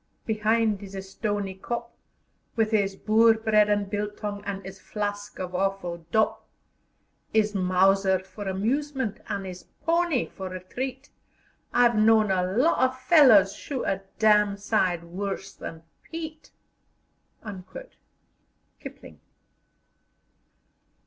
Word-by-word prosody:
be'ind 220 Hz, -1 st, +1 dB
'is 195 Hz, -1 st, -9 dB, 0.2 s
stony 205 Hz, -3 st, -2 dB
kop, 235 Hz, +5 st, -5 dB, 0.6 s
With 225 Hz, -1 st, +1 dB
'is 200 Hz, -2 st, +2 dB
Boer 225 Hz, +2 st, +4 dB
bread 215 Hz, -2 st, +3 dB
an' 205 Hz, -1 st, +2 dB
biltong, 205 Hz, 0 st, -4 dB
an' 195 Hz, -1 st, -5 dB
'is 190 Hz, 0 st, -9 dB
flask 205 Hz, 0 st, -4 dB
of 185 Hz, -1 st, -5 dB
awful 180 Hz, -3 st, -2 dB
dop; 220 Hz, 0 st, +1 dB, 0.9 s
'Is 215 Hz, -1 st, +3 dB
mauser 190 Hz, 0 st, +3 dB
for 190 Hz, +2 st, -9 dB
amusement 255 Hz, +4 st, -1 dB
an' 195 Hz, -1 st, -3 dB
'is 185 Hz, -1 st, -8 dB, 0.2 s
pony 335 Hz, -5 st, +2 dB
for 190 Hz, -2 st, -7 dB
retreat, 255 Hz, +10 st, -6 dB, 0.6 s
I've 240 Hz, -1 st, +4 dB
known 215 Hz, -1 st, +4 dB
a 185 Hz, -1 st, +2 dB
lot 250 Hz, -, +2 dB
o' 260 Hz, -, +4 dB
fellers 255 Hz, -, +6 dB
shoot 275 Hz, -3 st, -5 dB
a 195 Hz, 0 st, -1 dB, 0.2 s
dam' 210 Hz, -2 st, +4 dB
sight 190 Hz, -4 st, 0 dB
worse 195 Hz, +3 st, -5 dB
than 160 Hz, 0 st, -9 dB, 0.2 s
Piet." 315 Hz, -1 st, -8 dB, 2.3 s
KIPLING. -, -, -11 dB
205 Hz, 110 wpm, -26 LUFS, 195-230 Hz, 2.3 s, fellers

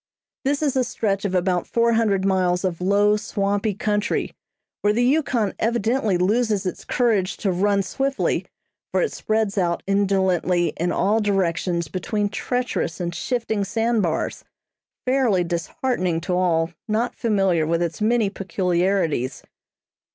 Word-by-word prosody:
This 285 Hz, +2 st, +1 dB
is 280 Hz, -3 st, +1 dB
a 260 Hz, -, +3 dB
stretch 205 Hz, -4 st, -1 dB
of 190 Hz, -2 st, -1 dB
about 180 Hz, -1 st, +1 dB
four 235 Hz, 0 st, +2 dB
hundred 205 Hz, -4 st, +2 dB
miles 185 Hz, -1 st, +1 dB
of 180 Hz, -2 st, -2 dB
low, 205 Hz, +3 st, +3 dB
swampy 205 Hz, 0 st, -1 dB
country, 210 Hz, +2 st, -1 dB, 0.5 s
where 205 Hz, 0 st, +3 dB
the 240 Hz, +3 st, +2 dB
Yukon 250 Hz, -7 st, +1 dB
evidently 225 Hz, -2 st, +1 dB
loses 210 Hz, +2 st, +1 dB
its 185 Hz, -, -4 dB
courage 215 Hz, -7 st, +1 dB
to 195 Hz, -, 0 dB
run 200 Hz, +2 st, +2 dB
swiftly, 270 Hz, +6 st, -1 dB, 0.4 s
for -, -, +2 dB
it 465 Hz, -, -1 dB
spreads 215 Hz, -2 st, 0 dB
out 170 Hz, -2 st, 0 dB
indolently 190 Hz, -4 st, +1 dB
in 175 Hz, +2 st, -1 dB
all 210 Hz, +4 st, +2 dB
directions 175 Hz, -4 st, 0 dB
between 205 Hz, +6 st, -2 dB
treacherous 245 Hz, -, -2 dB
and 175 Hz, -1 st, -3 dB
shifting 225 Hz, -1 st, -1 dB
sand 225 Hz, +3 st, 0 dB
bars, 165 Hz, -4 st, -2 dB, 0.6 s
fairly 250 Hz, -8 st, +2 dB
disheartening 180 Hz, -, -1 dB
to 180 Hz, -, -2 dB
all 170 Hz, -2 st, +1 dB, 0.2 s
not 225 Hz, +3 st, 0 dB
familiar 195 Hz, -8 st, +1 dB
with 170 Hz, +1 st, +1 dB
its 170 Hz, +4 st, -4 dB
many 225 Hz, 0 st, +3 dB
peculiarities. 180 Hz, -7 st, 0 dB
200 Hz, 140 wpm, -23 LUFS, 180-225 Hz, 0.6 s, a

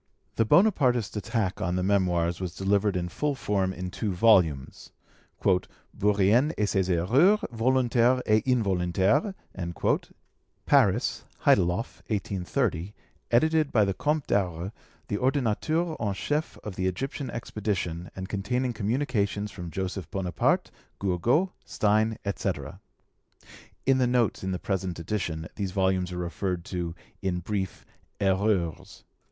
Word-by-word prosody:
The 115 Hz, -, +2 dB
Bonapartist 125 Hz, -, +3 dB
attack 105 Hz, -2 st, -2 dB
on 90 Hz, -, 0 dB
the 90 Hz, -, 0 dB
Memoirs 90 Hz, -3 st, +1 dB
was 90 Hz, -2 st, -4 dB
delivered 100 Hz, 0 st, +1 dB
in 90 Hz, -1 st, -1 dB
full 145 Hz, +10 st, -1 dB
form, 100 Hz, -6 st, 0 dB
in 90 Hz, 0 st, -5 dB
two 105 Hz, +1 st, -2 dB
volumes, 90 Hz, -8 st, +2 dB, 1.0 s
'Bourrienne 105 Hz, +8 st, +3 dB
et 105 Hz, -, +2 dB
ses 95 Hz, -2 st, 0 dB
Erreurs, 125 Hz, -, +4 dB
Volontaires 125 Hz, +1 st, +3 dB
et 110 Hz, 0 st, +3 dB
Involontaires' 100 Hz, -, +2 dB, 1.3 s
(Paris, -, -, +3 dB, 0.2 s
Heideloff, 90 Hz, +4 st, +2 dB
1830), 100 Hz, -1 st, -2 dB, 0.3 s
edited 155 Hz, +4 st, +3 dB
by 110 Hz, -3 st, +4 dB
the 95 Hz, -, 0 dB
Comte 150 Hz, +7 st, 0 dB
d'Aure, 90 Hz, -1 st, -1 dB, 0.4 s
the 100 Hz, -, -1 dB
Ordonnateur 145 Hz, +6 st, 0 dB
en 105 Hz, -3 st, -1 dB
Chef 150 Hz, +9 st, -2 dB
of 105 Hz, -3 st, -6 dB
the 95 Hz, 0 st, 0 dB
Egyptian 135 Hz, -, -3 dB
expedition, 95 Hz, -7 st, -3 dB
and 95 Hz, 0 st, -5 dB
containing 120 Hz, +6 st, -1 dB
communications 105 Hz, -2 st, -1 dB
from 90 Hz, -4 st, -7 dB
Joseph 95 Hz, -1 st, -4 dB
Bonaparte, 90 Hz, -4 st, 0 dB, 0.3 s
Gourgaud, 115 Hz, -, +1 dB
Stein, 110 Hz, +1 st, +1 dB
etc.' 100 Hz, -, -3 dB, 1.1 s
[In 135 Hz, 0 st, +4 dB
the 125 Hz, -, +3 dB
notes 120 Hz, -5 st, +1 dB
in 95 Hz, -, -2 dB
this 90 Hz, -, -3 dB
present 95 Hz, -2 st, -2 dB
edition 85 Hz, -2 st, -3 dB
these 100 Hz, -3 st, -2 dB
volumes 95 Hz, -2 st, +1 dB
are 90 Hz, -, -5 dB
referred 90 Hz, 0 st, -3 dB
to 85 Hz, -3 st, -4 dB, 0.3 s
in 95 Hz, -2 st, -1 dB
brief 95 Hz, 0 st, -3 dB, 0.3 s
'Erreurs'. 95 Hz, -3 st, 0 dB
100 Hz, 125 wpm, -27 LUFS, 90-120 Hz, 1.3 s, Erreurs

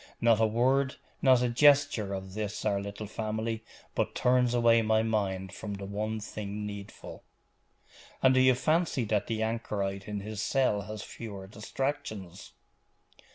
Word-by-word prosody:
Not 115 Hz, -2 st, +4 dB
a 110 Hz, -, +5 dB
word, 130 Hz, +4 st, +2 dB, 0.3 s
not 130 Hz, -2 st, +5 dB
a 125 Hz, -, +2 dB
gesture 140 Hz, -5 st, +4 dB
of 95 Hz, 0 st, -7 dB
this 105 Hz, 0 st, -4 dB
our 100 Hz, -2 st, +1 dB
little 100 Hz, +1 st, -6 dB
family, 110 Hz, +1 st, -3 dB, 0.3 s
but -, -, -1 dB
turns 125 Hz, -1 st, +3 dB
away 115 Hz, -1 st, +5 dB
my 110 Hz, 0 st, +2 dB
mind 95 Hz, -4 st, -1 dB
from 105 Hz, -1 st, -5 dB
the 100 Hz, 0 st, -7 dB
one 105 Hz, +2 st, -3 dB
thing 105 Hz, 0 st, -5 dB
needful.' 100 Hz, -1 st, -8 dB, 1.0 s
'And 130 Hz, 0 st, +6 dB
do 130 Hz, -, +4 dB
you 130 Hz, 0 st, +6 dB
fancy 155 Hz, -1 st, +1 dB
that 105 Hz, -2 st, 0 dB
the 110 Hz, -1 st, -1 dB
anchorite 100 Hz, -3 st, -2 dB
in 105 Hz, -1 st, -3 dB
his 105 Hz, 0 st, -5 dB
cell 125 Hz, -5 st, +2 dB
has 110 Hz, -1 st, -5 dB
fewer 100 Hz, -4 st, -8 dB
distractions? 110 Hz, -3 st, -5 dB
110 Hz, 155 wpm, -29 LUFS, 100-120 Hz, 1.0 s, And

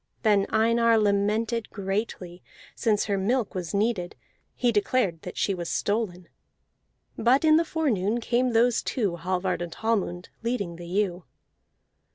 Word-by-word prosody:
Then 205 Hz, -3 st, +3 dB
Einar 230 Hz, +1 st, +3 dB
lamented 215 Hz, +3 st, +1 dB
greatly, 195 Hz, -3 st, -4 dB, 0.3 s
since 210 Hz, -2 st, +1 dB
her 200 Hz, -2 st, 0 dB
milk 230 Hz, +3 st, 0 dB
was 180 Hz, -4 st, -4 dB
needed: 200 Hz, -4 st, -1 dB, 0.4 s
he 245 Hz, -1 st, +2 dB
declared 205 Hz, -5 st, +1 dB
that 180 Hz, -, -8 dB
she 200 Hz, -, +1 dB
was 175 Hz, -2 st, -4 dB
stolen. 200 Hz, -5 st, -2 dB, 0.9 s
But 255 Hz, +7 st, +3 dB
in 310 Hz, 0 st, +6 dB
the 330 Hz, -, +3 dB
forenoon 240 Hz, -, 0 dB
came 245 Hz, +1 st, 0 dB
those 235 Hz, +1 st, +3 dB
two, 200 Hz, -9 st, -1 dB
Hallvard 180 Hz, 0 st, -1 dB
and 170 Hz, -1 st, -5 dB
Hallmund, 200 Hz, -6 st, -1 dB
leading 205 Hz, -8 st, -2 dB
the 175 Hz, 0 st, -9 dB
ewe. 185 Hz, -1 st, -1 dB
205 Hz, 140 wpm, -26 LUFS, 180-230 Hz, 0.9 s, in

